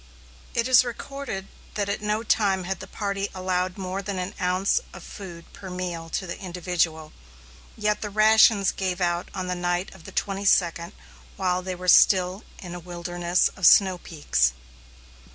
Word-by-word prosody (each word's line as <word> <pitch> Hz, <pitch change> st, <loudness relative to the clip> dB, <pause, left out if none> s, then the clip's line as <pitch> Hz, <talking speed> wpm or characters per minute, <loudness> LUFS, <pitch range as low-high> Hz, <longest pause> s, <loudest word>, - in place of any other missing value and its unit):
It 235 Hz, +1 st, +1 dB
is 255 Hz, -1 st, +7 dB
recorded 245 Hz, -4 st, -6 dB, 0.3 s
that 205 Hz, -1 st, -1 dB
at 200 Hz, -, -2 dB
no 210 Hz, +1 st, -1 dB
time 200 Hz, -4 st, +2 dB
had 190 Hz, +1 st, -3 dB
the -, -, -9 dB
party 200 Hz, -1 st, -3 dB
allowed 185 Hz, 0 st, -1 dB
more 190 Hz, 0 st, -4 dB
than 200 Hz, -1 st, -4 dB
an 180 Hz, +1 st, -4 dB
ounce 185 Hz, -, +1 dB
of -, -, -10 dB
food 175 Hz, -5 st, -10 dB
per 190 Hz, -, -9 dB
meal 175 Hz, -2 st, -5 dB
to 190 Hz, -, -3 dB
the 170 Hz, -, -6 dB
individual, 175 Hz, -4 st, -2 dB, 0.6 s
yet 210 Hz, -1 st, 0 dB
the 210 Hz, -, -3 dB
rations 215 Hz, -1 st, +5 dB
gave 185 Hz, -1 st, -3 dB
out 175 Hz, -1 st, -1 dB
on 185 Hz, -1 st, -3 dB
the 180 Hz, -, -2 dB
night 175 Hz, +1 st, -2 dB
of 190 Hz, -4 st, -16 dB
the -, -, -9 dB
twenty 200 Hz, 0 st, -2 dB
second, 170 Hz, -1 st, +2 dB, 0.4 s
while 185 Hz, -2 st, 0 dB
they 185 Hz, 0 st, -4 dB
were 180 Hz, +1 st, -8 dB
still 185 Hz, +2 st, +5 dB
in 175 Hz, -2 st, -8 dB
a 175 Hz, -, -6 dB
wilderness 175 Hz, 0 st, 0 dB
of 190 Hz, -4 st, +4 dB
snow 190 Hz, -3 st, +6 dB
peaks. 65 Hz, -, 0 dB
185 Hz, 170 wpm, -25 LUFS, 175-200 Hz, 0.6 s, is